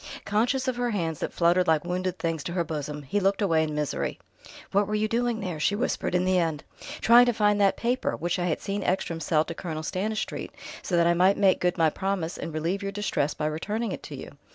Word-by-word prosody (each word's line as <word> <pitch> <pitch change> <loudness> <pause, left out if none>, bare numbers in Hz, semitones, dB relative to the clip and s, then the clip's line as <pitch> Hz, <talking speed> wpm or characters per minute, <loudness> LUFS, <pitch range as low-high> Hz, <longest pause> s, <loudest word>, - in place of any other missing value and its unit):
Conscious 245 +6 +1
of 255 -2 -1
her 245 0 0
hands 165 -8 -2
that - - -3
fluttered 175 +1 +3
like 160 0 +2
wounded 180 +1 -2
things 165 -3 -2
to 170 - -3
her 175 -1 +1
bosom, 150 -2 -5
he 140 +10 -1
looked 195 0 +1
away 165 -6 +3
in 155 -1 -2
misery. 150 -1 -2 0.5
"What 200 +1 +2
were 210 - -1
you 215 +1 +1
doing 235 0 0
there?" 175 -5 -4
she 200 +6 +2
whispered 205 -4 -1
in 180 0 +2
the 185 0 +3
end. 160 -4 -1 0.4
"Trying 240 +2 +7
to 240 - +3
find 210 -2 +2
that 195 -1 +3
paper, 245 +2 0
which 175 +1 -1
I 175 - 0
had 160 - -1
seen 200 0 -3
Ekstrom 175 -3 -1
sell 155 0 +1
to 165 - -5
Colonel 160 -2 -5
Stanistreet, 210 +6 -3 0.3
so 175 - -1
that 170 - +4
I 170 - +4
might 185 +3 +4
make 195 -2 +4
good 180 0 +1
my 160 -2 +3
promise 190 -3 -2
and 165 - -4
relieve 165 +6 -2
your 200 0 -3
distress 195 -8 -1
by 150 - -3
returning 205 +9 -2
it - - -5
to - - -8
you. - - -10
185 Hz, 240 wpm, -26 LUFS, 165-205 Hz, 0.5 s, Trying